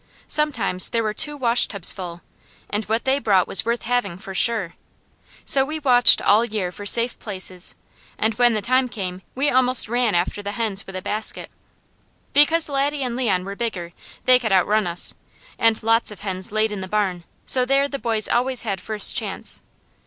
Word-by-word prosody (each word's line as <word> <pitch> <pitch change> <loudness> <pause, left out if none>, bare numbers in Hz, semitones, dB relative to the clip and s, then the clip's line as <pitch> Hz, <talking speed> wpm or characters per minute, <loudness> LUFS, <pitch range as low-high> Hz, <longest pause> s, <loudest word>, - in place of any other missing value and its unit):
Sometimes 235 -12 +1
there 230 -1 -1
were 215 -1 -2
two 295 +5 +2
washtubs 230 -7 +2
full, 175 -3 -8 0.5
and 210 +1 -2
what 225 +2 -2
they 265 +1 +1
brought 195 -8 +2
was - - +2
worth 235 +1 -2
having, 235 -7 -2
for 195 0 -9
sure. 210 -3 0 0.7
So 270 - +4
we 305 +3 -4
watched 250 -5 +5
all 210 +3 +4
year 210 -6 -3
for 205 +3 -8
safe 235 +3 +2
places, 185 -3 -1 0.4
and 220 +1 0
when 240 +1 +2
the 210 - -3
time 255 +2 +1
came 185 -5 -6
we 275 +3 +1
almost 255 -1 +3
ran 240 -3 0
after 175 +4 -1
the 205 0 -5
hens 210 -3 -1
with 195 - -9
a 185 - -6
basket. 215 +1 -2 0.8
Because 315 +3 +4
Laddie 285 0 -1
and 245 -2 -3
Leon 200 -8 -1
were 200 +1 -6
bigger 185 -7 -5 0.3
they 255 0 +5
could 225 -4 -3
outrun 205 +2 +2
us, 170 0 -3 0.5
and 225 -1 +1
lots 225 +1 +2
of 210 - -7
hens 190 -2 -4
laid 215 0 0
in 205 -2 -5
the 190 - -6
barn, 190 -4 -2 0.2
so 255 - +3
there 275 +2 +1
the 275 -1 -6
boys 225 -3 -1
always 250 +1 -1
had 195 -5 -4
first 215 -1 +2
chance. - - -4
220 Hz, 190 wpm, -21 LUFS, 195-250 Hz, 0.8 s, watched